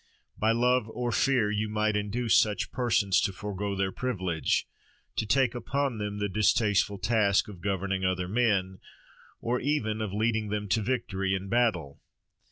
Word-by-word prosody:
By 110 +1 +2
love 125 0 +2
or 120 +1 -3
fear 115 -1 +2
you 105 +1 -1
might 110 0 0
induce 105 +1 0
such 105 -1 +2
persons 100 -6 +2
to - - 0
forgo 100 0 -4
their 95 0 0
privilege; 95 -9 -1 0.5
to 110 - -1
take 130 +1 +3
upon 135 -1 -2
them 105 0 -3
the 105 0 -1
distasteful 100 0 +2
task 100 0 +2
of 95 -5 -11
governing 95 0 -1
other 90 -1 0
men, 100 -4 +1 0.6
or 125 +2 0
even 110 -7 -1
of 105 -3 -3
leading 110 +1 0
them 105 0 -2
to 110 +3 +2
victory 95 -5 -1
in 95 +1 -5
battle. 95 - 0
105 Hz, 160 wpm, -28 LUFS, 95-115 Hz, 0.6 s, take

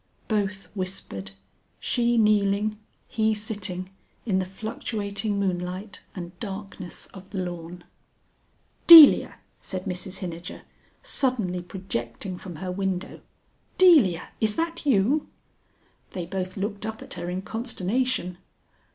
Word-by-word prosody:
Both 205 -2 -1
whispered, 185 - -5 0.5
she 240 -1 +1
kneeling, 210 -1 +3 0.3
he 220 -1 +1
sitting, 200 -3 -4 0.3
in 195 -5 +1
the 185 - -1
fluctuating 205 +1 -3
moonlight 185 +1 -3 0.2
and 175 -2 -6
darkness 195 -3 -7
of 190 0 -12
the 200 - -6
lawn. 175 -1 -5 1.0
"Delia!" 325 -4 +10 0.3
said 185 -1 -5
Mrs 185 0 -3
Hinijer, 175 -2 -7 0.4
suddenly 240 - 0
projecting 180 -1 -5
from 180 -3 -8
her 180 +4 -5
window; 190 -1 -3 0.6
"Delia, 295 - +5
is 215 -1 +2
that 330 -2 -3
you?" 260 +5 +3 0.9
They 180 -2 -4
both 185 +2 -4
looked 205 +1 -3
up 220 0 -5
at - - -9
her 175 -1 -5
in 185 +1 -3
consternation. 225 -3 -2
195 Hz, 115 wpm, -25 LUFS, 180-220 Hz, 1.0 s, Delia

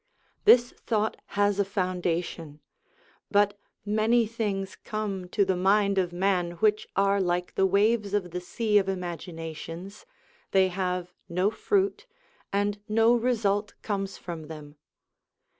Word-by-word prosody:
This 245 - +7
thought 215 -1 -1 0.2
has 205 0 +3
a - - +5
founda 180 -3 -1
tion; 155 -3 -9 0.7
but 205 0 +2 0.3
many 220 +3 +3
things 210 -4 -3
come 205 -5 -4
to 200 +2 +2
the 190 -1 +1
mind 200 +2 +3
of 180 -2 0
man 180 -1 0
which 210 +4 +1
are 200 0 +3
like 180 0 -1
the 190 - +3
waves 205 +1 +2
of 180 -4 -1
the 180 +1 -4
sea 210 +3 +2
of 195 -1 -2
imaginations, 175 - -6 0.5
they 190 -1 +5
have 180 -1 -2 0.2
no 180 +4 +1
fruit, 395 - 0 0.4
and 205 +1 0
no 225 +2 +4
result 215 -4 +1
comes 195 -2 -3
from 165 -3 -7
them. 150 -2 -10
195 Hz, 135 wpm, -27 LUFS, 180-210 Hz, 0.7 s, This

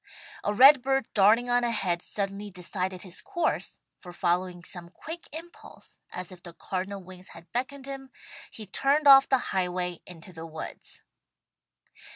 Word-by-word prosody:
A 205 - +1
red 265 +5 +8
bird 270 -1 +1
darting 215 +4 +5
on 245 0 +3
ahead 195 -7 0
suddenly 200 +1 -4
decided 185 0 -4
his 185 -3 -1
course, 345 -5 -1 0.2
for 180 - -10
following 175 0 -1
some 175 -1 -6
quick 325 - -8
impulse, 330 +3 -10
as 180 +1 -6
if 180 -1 -12
the 170 -1 -10
cardinal 190 +2 -4
wings 185 0 -12
had 165 +1 -15
beckoned 265 +3 -3
him, 270 -1 -7 0.4
he 220 - -8
turned 280 +9 +2
off 270 -1 +9
the 265 - +5 0.2
highway 180 -2 -1
into 180 +1 -9
the 165 0 -8
woods. 160 0 -8
195 Hz, 155 wpm, -28 LUFS, 180-265 Hz, 0.4 s, off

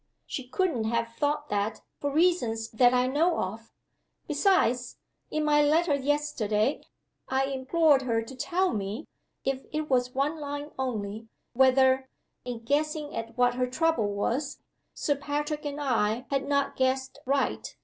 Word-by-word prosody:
"She 260 -2 -5
couldn't 285 - 0
have 230 +1 0
thought 295 +4 -1
that, 210 +1 -1 0.2
for 285 - -1
reasons 275 -9 +1
that 245 +2 +5
I 250 0 +3
know 315 +7 +2
of. 220 +5 -4 0.6
Besides, 285 - +2 0.3
in 310 - -1
my 295 0 +4
letter 310 +2 +3
yesterday 280 -5 0 0.5
I 265 +1 +2
implored 275 +2 +3
her 230 -3 0
to 245 +4 -10
tell 365 +8 0
me 205 +6 -3 0.4
(if 265 0 -1
it 305 -1 -3
was 250 -1 +1
one 295 +4 0
line 290 0 -5
only) 220 -4 -3 0.3
whether, 260 +1 +4 0.4
in 240 -2 -5
guessing 300 +3 -1
at 230 +1 -5
what 245 0 +4
her 250 0 0
trouble 310 -3 +1
was, 255 +8 -1 0.4
Sir 290 - 0
Patrick 295 +2 -3
and 290 0 -3
I 240 -3 0
had 275 0 0
not 280 -1 +1
guessed 260 0 0
right. 275 +1 0
265 Hz, 150 wpm, -28 LUFS, 240-295 Hz, 0.6 s, that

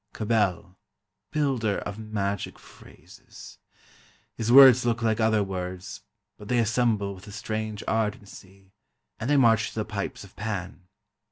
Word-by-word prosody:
Cabell, 100 -4 -1 0.5
builder 130 -8 0
of 100 +1 -6
magic 100 -2 -3
phrases! - - -15 0.7
His 115 +1 -2
words 130 -1 +9
look 120 0 -1
like 110 0 +1
other 110 -2 +2
words, 90 -1 -6 0.4
but 105 - -11
they 125 - +1
assemble 110 -3 +1
with 95 +2 -14
a - - -9
strange 110 0 -4
ardency, 100 -3 -4 0.5
and 115 +4 -3
they 145 - +4
march 115 -3 +4
to - - -15
the 110 -1 -2
pipes 100 -1 -5
of 100 - -16
Pan. 95 -4 -5
110 Hz, 140 wpm, -26 LUFS, 100-115 Hz, 0.7 s, words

